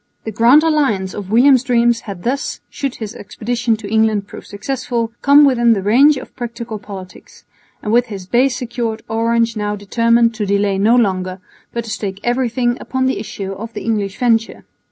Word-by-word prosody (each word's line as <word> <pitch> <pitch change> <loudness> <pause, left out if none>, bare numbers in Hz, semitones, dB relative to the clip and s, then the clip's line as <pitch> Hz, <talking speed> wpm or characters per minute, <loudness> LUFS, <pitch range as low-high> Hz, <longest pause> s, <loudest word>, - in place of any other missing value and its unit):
The 220 - -5
Grand 235 +8 +5
Alliance 270 -13 +1
of 200 -2 -7
William's 255 +3 +5
dreams 240 -2 +2
had 195 -6 -9
thus 270 +4 -2
(should 275 -3 -4
his 220 -1 -6
expedition 230 +1 -2
to 210 -2 -8
England 220 -1 +1
prove - - -11
successful) 235 +1 -3
come 285 +1 +6
within 240 -4 +4
the 195 -3 -2
range 270 +8 +5
of 260 - -10
practical 235 -3 -6
politics; 190 -3 -11 0.4
and 210 - -1
with 245 +1 +3
his 195 -4 -7
base 245 +5 +2
secured 235 -2 -4
Orange 230 +1 0
now 210 -1 -2
determined 230 +3 +2
to 215 -2 -3
delay 200 -1 +1
no 220 +4 +4
longer, 185 -5 0 0.3
but 235 - -3
to 225 - -7
stake 200 -2 -4
everything 240 0 0
upon 260 0 -2
the 260 - 0
issue 195 -2 -6
of 225 +4 -7
the - - -6
English 205 -4 -2
venture. 230 -2 0
230 Hz, 180 wpm, -17 LUFS, 205-245 Hz, 0.4 s, come